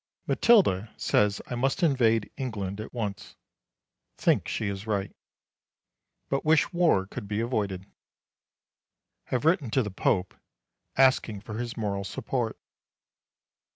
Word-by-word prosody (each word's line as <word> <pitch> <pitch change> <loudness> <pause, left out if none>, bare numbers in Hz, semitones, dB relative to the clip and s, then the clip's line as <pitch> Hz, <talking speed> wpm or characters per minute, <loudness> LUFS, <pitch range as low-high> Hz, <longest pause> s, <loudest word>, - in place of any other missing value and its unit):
Matilda 115 - +4
says 105 -1 +1
I - - -6
must 135 +7 0
invade 115 -8 +3
England 105 -6 -4
at 110 - -8
once. 105 -5 -5 0.8
Think - - +2
she 105 - -2
is 100 +2 -5
right. 100 -3 -2 1.1
But 135 - -1
wish 155 +3 +3
war 170 - +3
could 100 +1 -7
be 105 +1 -2
avoided. 105 -6 -2 1.4
Have 125 +2 -2
written 160 - +3
to 130 +3 +2
the 105 - -5
Pope 95 0 0 0.6
asking 130 -6 +3
for 110 +1 -6
his 120 -1 -4
moral 100 -3 -2
support. 115 +3 -3
110 Hz, 120 wpm, -27 LUFS, 100-130 Hz, 1.4 s, Matilda